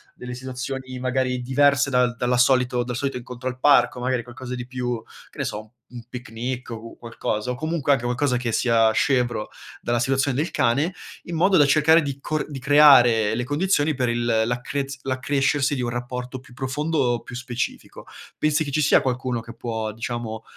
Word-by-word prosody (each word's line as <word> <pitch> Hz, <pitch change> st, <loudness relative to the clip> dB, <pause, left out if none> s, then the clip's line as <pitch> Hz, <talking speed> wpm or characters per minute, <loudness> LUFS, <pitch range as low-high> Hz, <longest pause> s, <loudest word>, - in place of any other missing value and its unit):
delle 125 Hz, 0 st, -7 dB
situazioni 130 Hz, +1 st, -6 dB
magari 130 Hz, 0 st, -1 dB
diverse 140 Hz, +1 st, +3 dB
dal 125 Hz, -2 st, +2 dB
dalla 125 Hz, +1 st, 0 dB
solito 125 Hz, -1 st, +3 dB
dal 125 Hz, 0 st, -4 dB
solito 135 Hz, +1 st, -2 dB
incontro 125 Hz, +1 st, -6 dB
al 125 Hz, -, -8 dB
parco, 140 Hz, -3 st, +4 dB
magari 125 Hz, -1 st, -1 dB
qualcosa 125 Hz, +1 st, -7 dB
di 125 Hz, -, -6 dB
più, 125 Hz, -2 st, -3 dB, 0.3 s
che -, -, -20 dB
ne -, -, 0 dB
so, -, -, -3 dB
u 110 Hz, 0 st, -14 dB, 0.2 s
un 120 Hz, -1 st, -9 dB
picnic 125 Hz, +1 st, -5 dB
o 115 Hz, -, -4 dB, 0.2 s
u -, -, -19 dB
qualcosa, 115 Hz, 0 st, -3 dB
o 125 Hz, -, -3 dB
comunque 155 Hz, 0 st, -1 dB
anche 130 Hz, -, -1 dB
qualcosa 125 Hz, +2 st, 0 dB
che 120 Hz, -1 st, -2 dB
sia 115 Hz, -2 st, +3 dB
scevro 120 Hz, -3 st, +1 dB, 0.3 s
dalla 120 Hz, 0 st, 0 dB
situazione 135 Hz, +2 st, +1 dB
del 155 Hz, +3 st, -1 dB
cane, 145 Hz, +6 st, +1 dB, 0.3 s
in 170 Hz, -, -6 dB
modo 190 Hz, +3 st, +4 dB
da 145 Hz, -, +6 dB
cercare 155 Hz, +3 st, +5 dB
di 140 Hz, -2 st, -4 dB
cor 155 Hz, +1 st, -2 dB
di 135 Hz, -, -5 dB
creare 125 Hz, -6 st, +6 dB
le 120 Hz, -, -1 dB
condizioni 150 Hz, +1 st, +1 dB
per 125 Hz, -2 st, 0 dB
il 120 Hz, 0 st, -1 dB
l'accrez 125 Hz, +4 st, -1 dB
l'accrescersi 140 Hz, +2 st, 0 dB
di 130 Hz, -, -2 dB
un 120 Hz, -, -1 dB
rapporto 125 Hz, +1 st, -5 dB
più 130 Hz, -, -17 dB
profondo, 130 Hz, -1 st, -1 dB
più 120 Hz, -, -9 dB
specifico. 125 Hz, -1 st, -5 dB, 0.3 s
Pensi 155 Hz, +1 st, +1 dB
che 140 Hz, -, -5 dB
ci 155 Hz, +2 st, +1 dB
sia 150 Hz, -, +5 dB
qualcuno 130 Hz, -2 st, -2 dB
che 115 Hz, 0 st, -11 dB
può, 110 Hz, -2 st, -3 dB
diciamo, 115 Hz, -1 st, -5 dB
125 Hz, 190 wpm, -23 LUFS, 120-140 Hz, 0.3 s, da